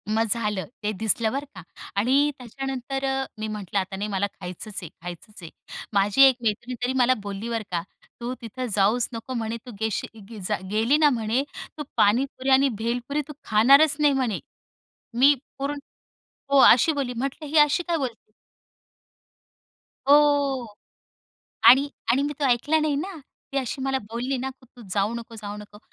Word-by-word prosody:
मग 225 +1 +2
झालं, 210 -4 0 0.2
ते 210 - 0
दिसलं 220 +1 +1
बरं 280 +2 -3
का 185 - -8 0.4
आणि 275 +7 +3
त्याच्यानंतर 270 +2 -4
अ, 270 0 0
मी 215 - -3
म्हटलं 205 -2 -3
आता 190 +1 -4
नाही 205 +2 -3
मला 195 +1 0
खायचंच 185 +3 -7
आहे, 170 - -7
खायचंच 180 +4 -9
आहे. 165 - -8 0.4
माझी 205 +5 +3
१ 265 -2 +6
मैत्रीण 230 +3 -2
तरी 250 +1 0
मला 250 +1 +5
बोलली 205 +3 -5
बरं 230 -2 -2
का, 170 -1 0 0.4
"तू 240 +1 -3
तिथं 245 +3 -5
जाऊच 215 +4 +2
नको 230 +3 -6
म्हणे 230 -1 -3
तू 250 - -8
गेलीच 220 0 -3
गी 225 -2 -9
जा 210 - +1
गेली 225 +7 +3
ना 295 - +7
म्हणे 235 0 0 0.3
तू 300 - -4
पाणीपुरी 260 +5 +2
आणि" 270 +1 +5
भेलपुरी 245 +5 -1
"तू 300 - -8
खाणारच 275 +8 +5
नाही 295 -1 +4
म्हणे." 255 -6 0 0.8
मी 280 +3 +7 0.2
पूर्ण 280 +2 -2 0.8
हो, 280 - +6
अशी 260 +5 +7
बोलली. 270 -4 -2
म्हटलं 275 +5 -4
ही 305 +2 0
अशी 295 +4 +4
काय 340 -1 +1
बोलली? 240 -6 -6 1.8
हो 285 -3 +4 1.0
आणि 275 +3 +7 0.2
आणि 260 +3 +2
मी 290 +1 -2
तो 290 - +1
ऐकला 270 +5 +2
नाही 305 -2 0
ना, 350 +5 -4 0.3
ती 275 - -2
अशी 265 +1 -3
मला 270 0 0
बोलली 250 +4 -2
ना 260 +2 -3
की 260 0 -16
तू 245 - -13
जाऊ 205 +2 +1
नको, 235 -1 -7
जाऊ 210 -1 -7
नको. 210 0 -12
245 Hz, 175 wpm, -25 LUFS, 215-275 Hz, 1.8 s, ना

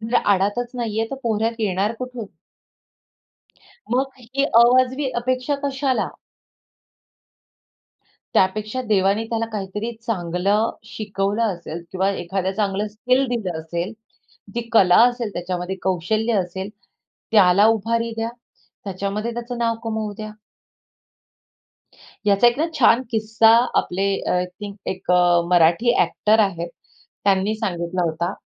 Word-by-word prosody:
म्हणजे 225 +2 0
आडातच 205 +5 +1
नाही 225 -3 -3
आहे, 225 +2 -2
तर 270 - -4
पोहऱ्यात 225 0 -1
येणार 200 +1 0
कुठून? 250 -3 -6 1.7
मग 265 +2 +1
ही 265 +4 -1 0.2
अवाजवी 255 +3 +3
अपेक्षा 255 +3 -1
कशाला? 270 -1 0 2.2
त्यापेक्षा 215 +6 +1
देवाने 200 +1 +2
त्याला 230 0 -1
काहीतरी 210 +2 -4 0.2
चांगलं 200 +2 0
शिकवलं 205 0 -2
असेल 170 0 -8
किंवा 190 +1 +1
एखादं 190 +1 -2
चांगलं 205 0 0
स्किल 250 +5 +1
दिलं 195 -9 -2
असेल, 170 +5 -4 0.6
ती 235 -1 -4
कला 185 -5 +6
असेल 240 -4 -4
त्याच्यामध्ये 180 +1 -4
कौशल्य 205 +5 0
असेल, 190 +2 -6 0.6
त्याला 200 -1 +6
उभारी 230 +1 0
द्या, 225 +1 -1 0.5
त्याच्यामध्ये 200 +4 -3
त्याचं 240 +1 -5
नाव 230 -1 0
कमवू 220 -2 -3
द्या. 215 0 -6 2.0
याचा 200 +3 +5
एक 240 +1 +4
ना, 315 - +2
छान 255 -3 +4
किस्सा 220 0 +3 0.3
आपले 190 +2 -1 0.2
अ, - - -3
आय 180 0 +1
थिंक 200 +2 -9
अ, - - 0
एक 185 -1 -5 0.4
मराठी 175 +7 +4
ॲक्टर 215 +1 +2
आहेत. 175 -5 0 0.6
त्यांनी 200 +2 +2
सांगितला 180 -4 -2
होता. 170 +1 -1
215 Hz, 120 wpm, -22 LUFS, 190-230 Hz, 2.2 s, कला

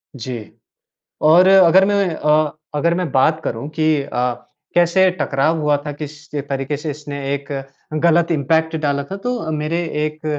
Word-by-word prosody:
जी। 125 -1 -5 0.8
और 170 +4 +6
अगर 190 -1 +6
मैं 200 -4 +1
अ 150 0 +2 0.2
अगर 170 +3 +2
मैं 180 -2 -2
बात 155 +4 +3
करूँ 115 +5 -4
कि, 155 -1 +1
अ, 125 -1 -1 0.4
कैसे 175 +2 +4
टकराव 155 +4 +1
हुआ 150 -1 +2
था। 150 - -3
किस 145 0 -7 0.2
तरीके 140 0 -3
से 150 +2 -5
इसने 145 0 -7 0.2
एक 140 0 -5 0.5
गलत 170 0 +3
इम्पैक्ट 160 +2 +1
डाला 140 -1 0
था, 190 +8 -7
तो 235 -6 -3
मेरे 155 +2 -2 0.3
एक 155 0 -7
155 Hz, 155 wpm, -19 LUFS, 140-170 Hz, 0.8 s, और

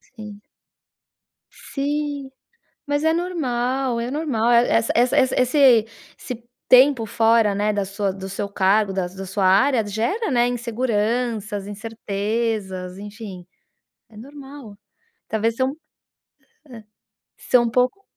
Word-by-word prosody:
Sim. 210 -2 -10 1.1
Sim, 285 -1 -4 0.5
mas 290 +1 -1
é 320 0 +3
normal. 265 -7 -1
É 235 +1 -3
normal 265 -6 0
essa 235 -1 +3
essa 245 +2 +3
esse 255 -1 +4 0.4
esse 240 -2 -8 0.2
tempo 255 -2 +5
fora, 225 -1 +3
né, 210 +2 0
da 205 -1 -1
sua 200 0 -2
do 190 0 -8
seu 200 +1 -4
cargo, 200 +1 +2
das 185 -2 -3
da 195 0 -6
sua 190 +1 -1
área, 220 +5 +3
gera, 235 - -2
né, 240 -1 +3
inseguranças, 230 -3 -2
incertezas. 205 -3 -3
Enfim, 205 -3 -9 0.6
é 215 - -16
normal. 270 -3 -11 0.5
Talvez 225 +2 -1
um 260 - +3
hã. - - -8 1.6
São 245 -1 +2
um 235 - 0
pouco 250 - +1
230 Hz, 120 wpm, -22 LUFS, 205-260 Hz, 1.6 s, tempo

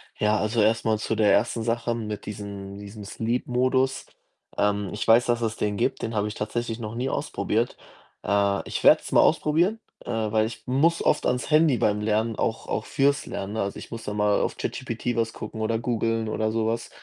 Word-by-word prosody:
Ja, 105 0 +2
also 110 +1 +1
erst 110 +2 +2
mal 110 -1 +2
zu 110 - -2
der 105 -2 +4
1. 115 -1 +2
Sache 115 +1 0
mit 105 -2 -5
diesem 100 -1 -7
diesem 105 +1 -9
Sleep 115 +4 -2
Modus. 130 +1 +1 0.5
Ähm, 105 -1 +1
ich - - -4
weiß, 115 +2 +6
dass 120 -1 +1
es 110 -1 -1
den 105 -1 -1
gibt, - - 0
den 115 0 -3
habe 105 0 +1
ich 105 - -5
tatsächlich 115 +2 -3
noch 110 0 -5
nie 125 +3 -1
ausprobiert. - - -1 0.5
Äh, 100 -1 +1
ich - - -4
werde - - +7
es - - -8
mal - - +6
ausprobieren, 175 +9 +2 0.3
äh, - - -8
weil 110 -1 +1
ich 110 -1 -9
muss 155 +7 +2
oft 150 - +2
ans 125 +4 -1
Handy 155 -5 +5
beim 105 0 +1
Lernen 110 +1 0
auch 115 - -2
auch 110 - -2
für's 140 0 +1
Lernen, 100 +1 -5
ne? 110 - -1
Also, 100 0 -3
ich - - -10
muss 115 -1 -6
dann 105 0 -4
mal 105 -1 +3
auf - - -2
ChatGPT 120 -1 -3
was 115 -1 0
gucken 110 - -7
oder 115 +1 +1
googeln 115 -1 -1
oder 110 0 -1
so 110 0 0
was. 115 +1 -2
110 Hz, 215 wpm, -25 LUFS, 105-120 Hz, 0.5 s, werde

